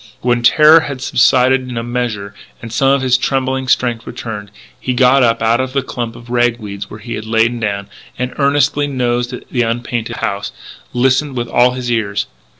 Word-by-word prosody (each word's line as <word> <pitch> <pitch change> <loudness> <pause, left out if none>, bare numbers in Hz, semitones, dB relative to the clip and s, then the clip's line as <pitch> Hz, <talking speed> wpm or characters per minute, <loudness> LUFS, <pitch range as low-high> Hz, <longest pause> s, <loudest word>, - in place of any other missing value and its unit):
When 120 -1 +1
terror 155 +6 +7
had 140 -4 -5
subsided 130 +1 +3
in 120 - -5
a 115 - -2
measure 115 -5 -3 0.3
and 115 -1 -9
some 135 +4 +2
of 135 -1 +2
his 125 -1 +3
trembling 130 0 -1
strength 120 -2 0
returned, 110 -4 -6 0.3
he 125 - -2
got 130 +2 +5
up 115 -2 +2
out 115 +2 +3
of 130 0 -4
the 135 -1 0
clump 120 -3 -5
of 120 0 -12
rag 120 -1 +2
weeds 100 -3 -7
where 105 - -10
he 115 - -6
had 110 - -6
lain 115 +2 +1
down, 100 -3 -2 0.3
and 125 0 -3
earnestly 145 +1 +2
nosed 125 -2 -1 0.2
the 125 - 0
unpainted 120 0 -2
house, 100 0 -3 0.4
listening 130 +3 +1
with 120 -1 -3
all 125 +1 +3
his 125 -1 -3
ears. 105 -3 -1
120 Hz, 190 wpm, -16 LUFS, 115-130 Hz, 0.4 s, terror